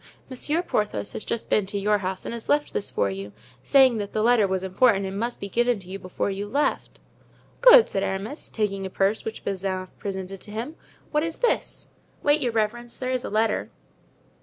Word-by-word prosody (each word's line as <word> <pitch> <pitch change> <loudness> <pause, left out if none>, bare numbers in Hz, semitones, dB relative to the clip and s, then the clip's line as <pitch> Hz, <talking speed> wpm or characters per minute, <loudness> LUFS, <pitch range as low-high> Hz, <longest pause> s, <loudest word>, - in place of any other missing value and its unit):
Monsieur 300 +6 -1
Porthos 105 - -1
has - - -5
just 235 - -3
been 205 -3 +2
to 200 - -3
your 205 +1 +2
house 190 0 -4
and - - -4
has 235 -1 -7
left 295 0 +2
this - - -1
for 100 - 0
you, 100 +1 -7 0.3
saying 260 - +5
that 205 -1 -5
the 215 - 0
letter 235 -3 +4
was 190 0 -1
important 195 +1 +3
and 195 +1 -4
must 235 +2 -2
be 200 - -5
given 240 +3 +1
to 185 - -15
you 195 +1 -6
before 185 +2 -3
you 200 +1 -4
left." 285 +7 -1 0.6
"Good," - - +9
said 195 - -2
Aramis, 195 +10 -3
taking 195 -3 -2
a 190 - -4
purse 195 +3 0
which 220 - -6
Bazin 185 -1 -3
presented 190 -1 -5
to - - -10
him. 230 +9 -5 0.4
"What 300 - +2
is 330 0 -3
this?" 485 - -1 0.3
"Wait, 295 +1 +3
your 245 -3 +1
reverence, 235 +2 -1
there 255 0 -3
is 255 -1 -1
a - - -4
letter." 220 +2 +1
210 Hz, 210 wpm, -25 LUFS, 195-245 Hz, 0.6 s, Good